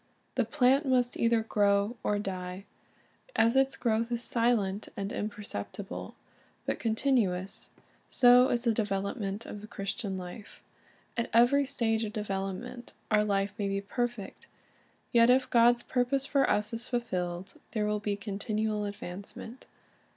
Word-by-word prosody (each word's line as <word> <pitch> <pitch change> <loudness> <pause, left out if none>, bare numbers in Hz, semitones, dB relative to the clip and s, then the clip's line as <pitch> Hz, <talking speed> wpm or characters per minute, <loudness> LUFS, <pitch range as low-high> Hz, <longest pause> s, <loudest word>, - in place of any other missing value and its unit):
The - - +1
plant 270 +1 +3
must 250 -2 +2
either 230 -1 +2
grow 205 +1 +2
or 210 - +1
die. 185 -1 -5 0.7
As 230 +2 +4
its 270 0 +3
growth 230 0 0
is 235 0 -1
silent 225 -5 +1
and 200 0 -3
imperceptible, 205 - -5 0.5
but - - -2
con 225 -2 0
tinuous, 200 -8 +1 0.4
so 250 +1 +6
is 240 0 +1
the 230 -2 +3
development 200 0 -2
of 205 - -7
the 215 - -9
Christian 195 -1 -4
life. 185 +4 -9 0.5
At 235 - -1
every 255 +5 +5
stage 225 -5 +1
of 210 -1 -4
development 210 +4 -4 0.2
our 210 0 +5
life 200 -1 0
may 200 - 0
be 195 0 0
perfect; 235 0 -4 0.6
yet 235 -1 +6
if 255 0 +4
God's 240 0 +5
purpose 260 +2 0
for 275 -1 +2
us 210 +2 +1
is 230 +1 -3
fulfilled, 185 -6 -3 0.2
there 215 -3 0
will 210 0 0
be 205 0 -1
continual 210 +1 -2
advancement. 200 +4 -8
215 Hz, 145 wpm, -30 LUFS, 200-240 Hz, 0.7 s, so